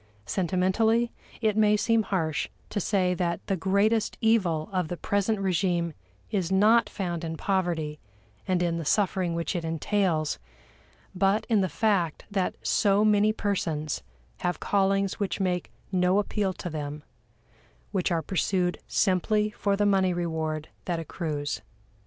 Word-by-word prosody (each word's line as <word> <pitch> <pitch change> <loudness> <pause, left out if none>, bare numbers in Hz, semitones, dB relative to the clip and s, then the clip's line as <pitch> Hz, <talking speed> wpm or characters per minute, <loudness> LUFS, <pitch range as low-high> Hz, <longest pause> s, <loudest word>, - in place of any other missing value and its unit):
Sentimentally, 195 - +1 0.3
it 215 -2 +2
may 210 -1 +4
seem 230 +1 +3
harsh 165 -7 -1 0.2
to 210 - -1
say 185 -2 +1
that 175 -2 -1
the 195 - 0
greatest 200 +5 +1
evil 185 -9 +2
of 180 -3 0
the 175 - -4
present 205 +3 0
regime 175 -3 0 0.4
is 190 -4 -1
not 215 +3 +5
found 175 -4 -3
in 160 -1 -4
poverty 170 -6 -1 0.5
and 180 -1 +2
in 170 -1 0
the 165 - -3
suffering 185 0 +1
which 170 +3 -2
it 170 - -2
entails, 165 -1 0 0.7
but 195 +3 +2
in 215 -3 +4
the 185 - 0
fact 180 -3 0
that 195 -2 0
so 205 0 +3
many 210 0 +4
persons 165 -8 -2 0.4
have 180 0 -2
callings 195 -1 +1
which 200 -1 -1
make 180 -2 -1 0.2
no 180 0 +3
appeal 205 -1 0
to 180 - -7
them, 150 -1 -5 0.9
which 190 -3 0
are 165 -2 +1
pursued 180 +1 0
simply 210 +2 +2
for 200 -1 0
the 205 +1 +1
money 190 -2 +3
reward 160 -3 -2 0.2
that 175 -2 -1
accrues. 155 -3 -3
185 Hz, 145 wpm, -27 LUFS, 170-205 Hz, 0.9 s, not